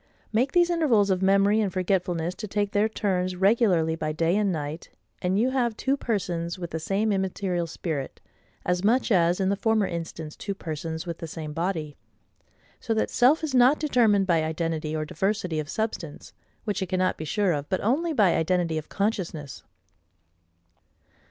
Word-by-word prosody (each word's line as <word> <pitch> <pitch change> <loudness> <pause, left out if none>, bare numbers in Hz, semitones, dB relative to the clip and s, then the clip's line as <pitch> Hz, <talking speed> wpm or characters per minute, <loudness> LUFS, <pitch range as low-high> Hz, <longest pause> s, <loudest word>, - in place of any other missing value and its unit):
Make 250 +5 +1
these 350 0 +4
intervals 240 - +3
of 185 0 +1
memory 200 +3 +4
and 200 -3 0
forgetfulness 180 -2 -1
to 215 +3 -7
take 205 0 -1
their 210 +1 +2
turns 185 -4 -1
regularly 185 -5 +3
by 155 -1 -2
day 165 +3 +1
and 205 -2 +2
night, 155 0 -5 0.3
and 185 +2 +1
you 245 +5 +2
have 240 -4 0
two 270 +1 +1
persons 175 -9 -2
with 175 -2 -6
the 160 - -3
same 200 +6 0
immaterial 190 -2 -1
spirit, 155 -4 -4 0.5
as 180 +1 0
much 240 +4 +2
as 175 -2 +3
in 190 -1 +1
the 200 - +2
former 220 0 +2
instance 165 -3 -5
two 200 -1 -5
persons 160 -1 -5
with 170 -1 -5
the 165 - -5
same 155 -1 -6
body. 160 -3 -3 0.8
So 225 - -2
that 220 - 0
self 280 +7 +4
is 305 -4 -2
not 255 +3 +5
determined 230 -9 +3
by 170 -4 +2
identity 160 -1 -2
or 155 0 -2
diversity 180 0 -1
of 150 -1 -5
substance, 215 -9 -4 0.3
which 205 -2 -2
it 190 - -1
cannot 185 0 +1
be - - -4
sure 195 +5 +1
of, 145 -2 -3
but 185 - 0
only 295 +10 +1
by 210 - +3
identity 165 -1 +1
of 155 - -12
consciousness. 185 -9 -3
185 Hz, 175 wpm, -26 LUFS, 165-215 Hz, 0.8 s, not